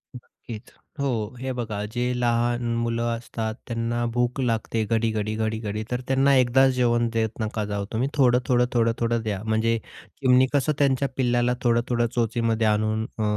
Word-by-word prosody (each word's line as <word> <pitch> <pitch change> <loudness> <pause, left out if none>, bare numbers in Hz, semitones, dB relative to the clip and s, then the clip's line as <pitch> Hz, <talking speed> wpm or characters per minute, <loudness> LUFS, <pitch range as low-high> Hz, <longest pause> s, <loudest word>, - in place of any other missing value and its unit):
नक्कीच 115 -2 -11 0.3
हो. 120 -5 -2
हे 130 +1 -3
बघा, 110 -4 -4
जे 125 +1 0
लहान 120 0 +1
मुलं 115 0 -1
असतात 115 -1 -4
त्यांना 120 0 -1
भूक 120 +2 0
लागते 115 -2 0
घडी-घडी, 110 -1 0
घडी-घडी. 110 -1 -2
तर 125 0 -1
त्यांना 135 +1 +3
एकदाच 130 +2 +4
जेवण 120 -2 +2
देत 110 0 -1
नका 110 -1 -2
जाऊ 100 -1 -3
तुम्ही, 120 +4 0
थोडं-थोडं, 125 -2 +3
थोडं-थोडं 115 0 +1
द्या. 105 -3 -3
म्हणजे 110 +1 +1 0.4
चिमणी 130 -1 +4
कसं 145 +1 +2
त्यांच्या 140 -1 +2
पिल्लाला 120 -1 +2
थोडं-थोडं 120 0 +2
चोचीमध्ये 115 -1 +1
आणून 110 +1 +1
अ, 110 - -1
120 Hz, 150 wpm, -24 LUFS, 110-125 Hz, 0.4 s, एकदाच